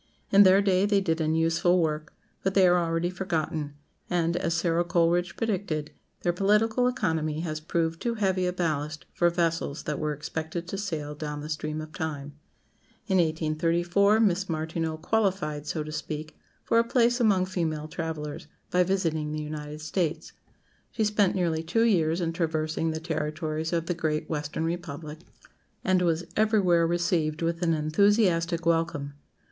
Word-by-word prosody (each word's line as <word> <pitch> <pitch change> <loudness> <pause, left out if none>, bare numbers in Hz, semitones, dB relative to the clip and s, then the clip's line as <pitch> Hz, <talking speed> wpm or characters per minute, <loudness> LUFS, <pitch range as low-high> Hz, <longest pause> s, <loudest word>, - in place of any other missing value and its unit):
In 200 - +7
their 195 0 +6
day 195 0 +3
they 205 -1 +3
did 165 -4 0
an 155 0 +1
useful 165 +2 +3
work, 155 -2 -1 0.3
but 190 0 -1
they 190 -2 +6
are 180 0 +4
already 165 +1 -1
forgotten; 160 -5 -2 0.3
and, 170 -1 +1
as 170 -1 0
Sara 170 0 +1
Coleridge 175 0 +1
predicted, 185 -9 -2 0.3
their 175 - +2
political 210 +6 +2
economy 160 -11 -1
has 155 -2 -3
proved 165 +1 -1
too 235 -1 -1
heavy 190 -4 +1
a - - +1
ballast 155 -3 -2
for 175 - +3
vessels 165 -4 -1
that 150 -1 -3
were 155 -1 -1
expected 160 +3 -5
to - - -3
sail 160 -7 -3
down 150 0 -5
the 150 - -7
stream 155 0 -3
of 155 0 -9
time. 145 -3 -4 0.7
In 190 -4 +1
1834 170 +5 +2
Miss 195 -3 +2
Martineau 160 0 -2
"qualified," 170 -5 -1
so 155 -1 -2
to 155 - -7
speak, 155 0 -5 0.3
for 230 - +3
a - - +4
place 240 +1 +2
among 200 -6 +3
female 160 -5 -2
travellers, 155 -2 -5 0.2
by 180 - +3
visiting 165 -5 0
the 155 0 -3
United 150 0 -6
States. 160 0 -2 0.6
She 220 - -1
spent 210 -2 +2
nearly 170 -4 0
two 175 +8 +1
years 170 -6 +2
in 165 -1 -1
traversing 160 -1 -1
the 160 0 -2
territories 155 0 -3
of 165 -1 0
the 175 - -1
Great 155 -2 -2
Western 150 0 -3
Republic, 160 -2 -5 0.6
and 185 -1 +2
was 170 -1 +1
everywhere 195 -6 +3
received 170 -2 0
with 165 +1 -1
an 165 -2 +2
enthusiastic 170 +1 +2
welcome. 165 -4 0
165 Hz, 165 wpm, -27 LUFS, 155-185 Hz, 0.7 s, In